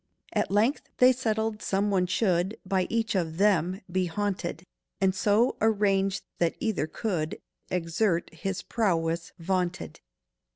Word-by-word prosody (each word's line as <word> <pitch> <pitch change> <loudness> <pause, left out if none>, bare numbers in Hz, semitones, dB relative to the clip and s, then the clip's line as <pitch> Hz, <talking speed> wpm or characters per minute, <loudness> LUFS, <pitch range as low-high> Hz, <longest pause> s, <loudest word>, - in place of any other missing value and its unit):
At - - +1
length 220 +8 +1
they 255 +1 +7
settled 220 -3 -1
some 200 +1 0
one 185 -2 +2
should 185 0 +1
By 185 -1 +1
each 225 -2 0
of 165 -4 -1
them 190 -2 +2
be 185 0 +1
haunted, 180 -3 -3 0.3
And 190 -1 +3
so 210 +5 +2
arrange 200 -3 +2 0.2
that 170 -1 +1
either 215 -9 -1
could 160 -3 -2 0.3
Exert 175 +1 0
his 195 -2 -4
prowess 170 -6 0
vaunted. 180 0 -2
190 Hz, 130 wpm, -28 LUFS, 175-210 Hz, 0.3 s, they